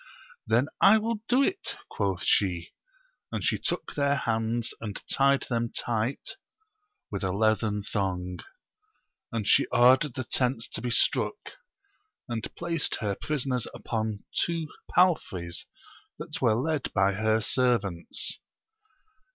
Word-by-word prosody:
Then 115 +4 +3 0.2
I 205 +3 +8
will 225 0 -1
do 255 +3 +5
it, 380 +6 -1
quoth 95 -3 -2
she 90 -4 +3
j 85 - -16 0.6
and - - -3
she - - +1
took - - -3
their 140 -1 +2
hands, 115 -2 -1
and 105 -3 -4
tied 140 0 +3
them 115 -1 -1
tight 115 +2 -2 0.7
with - - -3
a 95 - 0
leathern 110 0 +1
thong; 90 -3 -2 0.9
and 110 -4 -2
she - - +5
ordered 130 +2 +5
the 130 - -2
tents 125 0 0
to - - -5
be 125 - -2
struck, 120 - 0 0.7
and 115 -3 -3
placed 170 -2 -1
her 105 -2 -1
prisoners 130 -1 -1
upon 110 -3 -3 0.2
two 165 -3 -2 0.2
palfreys 95 - +1 0.5
that - - -6
were 110 - +4
.led 145 +3 -1
by 100 -1 +3
her 110 +2 +2
servants. 110 -8 0
115 Hz, 130 wpm, -28 LUFS, 105-140 Hz, 0.9 s, I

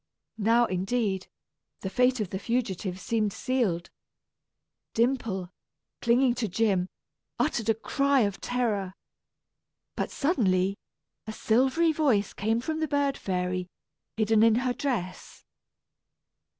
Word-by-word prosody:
Now, 230 +3 +4
indeed, 190 0 -1 0.5
the 190 - -3
fate 250 +1 +3
of 205 -4 -3
the 190 - -3
fugitives 195 -5 -2
seemed 220 -4 0
sealed. 195 -9 -1 1.0
Dimple, 230 -7 0 0.5
clinging 245 +1 +3
to 220 - 0
Jim, 190 -2 +1 0.5
uttered 240 -7 0
a 225 - +4
cry 275 +4 +2
of 200 -3 -1
terror. 210 -7 -1 1.0
But - - -2
suddenly, 195 - +1 0.5
a - - -3
silvery 260 +10 +2
voice 265 -11 +1
came 225 +3 0
from 315 +5 -3
the 315 - 0
bird 285 -1 +1
fairy 180 -1 -2 0.5
hidden 220 0 +3
in 225 -1 +6
her 250 +1 0
dress. 235 -11 -4
225 Hz, 115 wpm, -27 LUFS, 190-255 Hz, 1.0 s, in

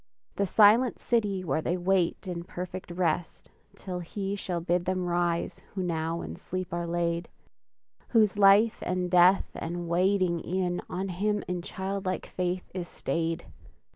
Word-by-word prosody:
The 200 - +1
silent 225 +6 +5
city 205 -5 0
where 155 -2 0
they 175 +3 -1
wait 180 +1 +1
In 170 -2 -4
perfect 180 0 -7
rest 175 -1 -2 0.2
till 180 -2 -5
He 195 +3 -4
shall 180 -3 -3
bid 175 +1 0
Them 185 0 -1
rise 175 -1 -1
who 190 - -1
now 165 -1 -2
in - - -7
sleep 185 -2 -5
are 170 0 -2
laid; 170 0 -1 0.8
Whose 215 -4 +3
life, 205 +2 +5
and 180 0 -1
death, 180 +2 +5
and 175 +1 -4
waiting 180 0 +2
e'en, 180 0 -1
On 190 +2 -3
Him 205 +3 0
in 180 -1 -2
childlike 190 +1 -3
faith 180 0 -3
is 180 -2 -4
stayed! 165 0 -2
180 Hz, 150 wpm, -28 LUFS, 175-195 Hz, 0.8 s, silent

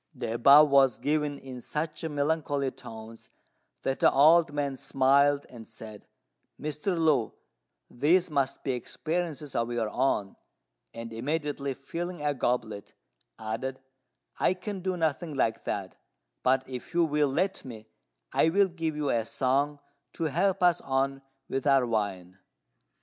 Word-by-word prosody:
The 110 - -3
above 140 +5 +7
was 135 -2 +5
given 150 -1 -1
in 130 -2 -9
such 155 +6 -4
melancholy 145 -2 -1
tones 110 0 -11 0.5
that 135 - -1
the - - +5
old 160 +3 +5
man 145 -2 -2
smiled 140 +1 +3
and 115 -3 -12
said, 110 -2 -11 0.5
"Mr. 155 +5 -2
Lu, 150 -8 +2 0.5
these 170 +8 +2
must 135 -2 -1
be 135 - 0
experiences 155 +3 -3
of 115 0 0
your 115 -2 -1
own," 110 -7 0 0.5
and, 115 0 -8
immediately 140 +2 -2
filling 170 +4 -6
a 145 - +2
goblet, 115 -5 -2 0.4
added, 115 +4 -4 0.6
"I 185 - +2
can 195 +2 -6
do 185 0 -2
nothing 160 -1 -1
like 115 -4 0
that; 95 -2 -4 0.4
but 130 +1 +2
if 130 +7 -8
you 175 - +4
will 150 -2 +1
let 185 +8 -1
me, 110 -4 -9 0.5
I 160 - +4
will 195 +3 +3
give 165 -3 -3
you 150 -2 -1
a 115 -1 +1
song 140 +5 0 0.3
to 165 - -4
help 185 +5 +1
us 175 -1 +4
on 135 0 -1 0.3
with 135 +2 -2
our 135 -2 +5
wine." 95 -5 -3
140 Hz, 145 wpm, -28 LUFS, 125-155 Hz, 0.6 s, above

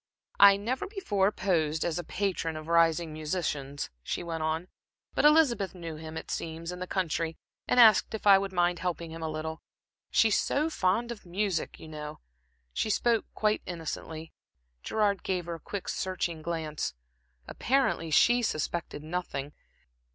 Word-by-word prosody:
"I 200 0 +9
never 250 - -2
before 210 - +1
posed 160 -7 0
as 170 0 -1
a - - -4
patron 180 -3 -2
of 155 0 -7
rising 165 -1 +3
musicians," 150 -3 -3
she - - -3
went 165 -1 -4
on, 160 +3 -1 0.5
"but - - +2
Elizabeth 270 -12 +4
knew 165 -3 -6
him, 160 +1 -7
it - - -6
seems, 165 +1 -4
in 180 - -7
the 185 - -4
country, 165 -3 -1 0.3
and 250 - +3
asked 220 -2 +7
if 215 - -7
I 195 -1 +8
would 195 0 -3
mind 175 -1 +1
helping 170 -2 -3
him 165 0 -7
a 160 - -2
little. 160 +1 -4 0.5
She's 220 -3 +4
so 305 +3 0
fond 225 +2 +1
of 230 - -8
music, 185 +1 -2
you - - -10
know." 150 -1 -7 0.5
She - - -1
spoke 230 +1 +2
quite 215 0 +1
innocently. 160 -1 -6 0.5
Gerard 205 - +1
gave 180 -2 -2
her 170 - -4
a 165 - -7
quick, 200 +2 -6
searching 175 -3 -2
glance. 155 - -3 0.5
Apparently 255 -10 +1
she 240 +10 +5
suspected 155 -6 -2
nothing. 155 -4 -4
175 Hz, 160 wpm, -29 LUFS, 160-200 Hz, 0.5 s, I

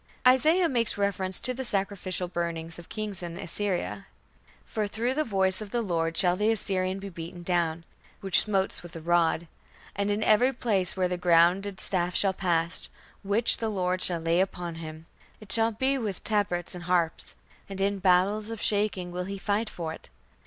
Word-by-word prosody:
Isaiah 310 +8 +4
makes 235 -8 +1
reference 195 -2 +3
to 255 - -1
the 265 +1 -5
sacrificial 195 -4 -1
burning 170 -2 -4
of 170 - -13
kings 210 -4 -3
in 170 -1 -6
Assyria: 175 - -2 0.6
"For 215 -2 -2
through 230 +5 -1
the 305 +3 0
voice 190 -5 +3
of 210 - -7
the 235 +2 -1
Lord 165 -4 -1
shall 180 -1 +3
the 210 +3 +1
Assyrian 190 -4 0
be 200 0 -7
beaten 170 0 -9
down, 170 -2 -1 0.4
which 195 -2 +3
smote 195 -2 0
with 175 -1 -12
a - - -5
rod. 170 0 +1 0.5
And 200 +1 -1
in 205 +1 0
every 245 +6 +4
place 200 -7 0
where 185 -1 +2
the 180 0 -3
grounded 180 +3 +3
staff 180 -2 -1
shall 195 -1 +4
pass, 170 -2 -1 0.3
which 205 +4 +3
the 225 - -1
Lord 185 -2 -1
shall 175 -2 0
lay 165 +1 +1
upon 180 -2 -2
him, 155 0 -9 0.3
it 215 -3 -11
shall 225 +1 +5
be 265 +5 0
with 210 -5 -4
tabrets 200 -5 -1
and 175 -1 -8
harps: 175 -2 -1 0.3
and 195 -1 -7
in 200 +1 0
battles 195 +4 +2
of 225 -1 -6
shaking 200 -4 0
will 180 +1 -4
he 200 +1 -5
fight 205 +3 -2
with 160 -2 -3
it. - - -13
190 Hz, 185 wpm, -27 LUFS, 175-210 Hz, 0.6 s, shall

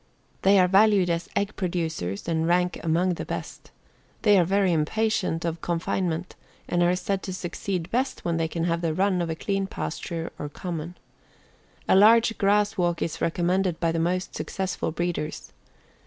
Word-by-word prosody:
They 195 +1 +5
are 180 -1 +5
valued 195 -1 +4
as 170 0 -2
egg 200 +1 -1
producers 160 - -3
and 165 -1 0
rank 180 +1 +1
among 175 +3 +2
the - - -5
best. - - -6 0.5
They 205 -3 +6
are - - +5
very 190 +1 +2
impatient 165 +1 0
of 165 0 -3
confinement 175 0 -2 0.3
and 175 - 0
are 175 +1 +3
said 195 +1 -2
to 190 - -5
succeed 185 0 -4
best 255 +3 -1
when 170 -1 0
they 165 0 0
can 165 +1 -3
have 170 0 0
the 165 -2 -1
run 185 -1 +2
of 170 - -2
a 160 - -2
clean 195 +3 -2
pasture 165 -4 -5
or 145 - -4
common. 170 +1 -6 0.9
A - - +5
large 225 +3 +6
grass 205 +1 +2
walk 175 -2 +1
is 165 - -4
recommended 175 +1 0
by 165 -2 +1
the 165 - -1
most 180 +2 -1
successful 190 -3 -3
breeders. 170 -2 -3
175 Hz, 170 wpm, -25 LUFS, 165-195 Hz, 0.9 s, They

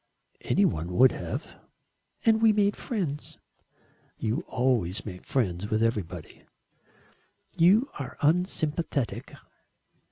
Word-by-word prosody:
"Any - - +3
one 85 +3 -1
would 130 +7 +6
have." - - -4 0.8
"And 220 -1 +4
we 225 -1 +6
made 205 -1 +2
friends." 170 - -4 0.8
"You 115 +10 -1
always 115 -6 0
make 90 -4 -8
friends 105 -6 -1
with 110 0 +1
everybody." 90 -7 -3 1.1
"You 200 +10 +5
are 135 - -6
unsympathetic." 155 - 0
130 Hz, 100 wpm, -27 LUFS, -, 1.1 s, would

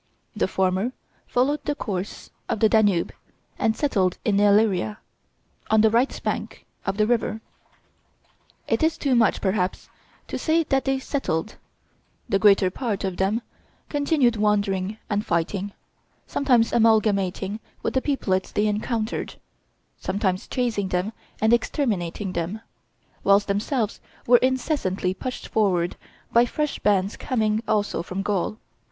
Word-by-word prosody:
The 210 - +1
former 190 +6 0 0.3
followed 275 +4 +1
the 290 - -1
course 195 -6 -5 0.2
of - - -1
the 220 - +5
Danube 205 -5 +3 0.5
and 220 0 +1
settled 195 -11 +1
in 200 -2 +2
Illyria, 205 - +3 0.7
on 220 0 +5
the 220 0 +4
right 240 +4 +2
bank - - -3 0.2
of 195 - -1
the 215 - +3
river. 225 -1 0 1.3
It - - +1
is 320 0 +2
too 275 -3 0
much, 235 -4 +3
perhaps, 190 -2 -1 0.4
to - - -4
say 330 +1 +2
that 270 -3 0
they 270 0 +1
settled; 240 - -2 0.7
the 195 -5 +1
greater 195 -2 +5
part 220 -2 -3
of 190 -2 -2
them 205 +5 0 0.5
continued 285 -5 +2
wandering 205 -1 +1
and 205 -1 0
fighting, 185 +3 -1 0.5
sometimes 245 -5 +2
amalgamating 210 -3 +2 0.2
with - - -1
the 260 - +2
peoplets 195 -11 -1
they 210 - +1
encountered, 215 +2 -2 0.6
sometimes 190 -1 -1
chasing 230 -6 -1
them 185 +4 -1 0.3
and 220 +2 +3
exterminating 205 - -1
them, 175 +6 -3 0.6
whilst 200 +1 +4
themselves 215 +3 -1 0.2
were 245 +1 +7
incessantly 250 - 0
pushed 250 +6 -6
forward 180 -5 +1 0.4
by 235 - +6
fresh 300 +4 -2
bands 200 -1 +1
coming 220 -4 0
also 205 -5 0
from 185 +3 -4
Gaul. 205 +1 -1
210 Hz, 135 wpm, -24 LUFS, 190-240 Hz, 1.3 s, were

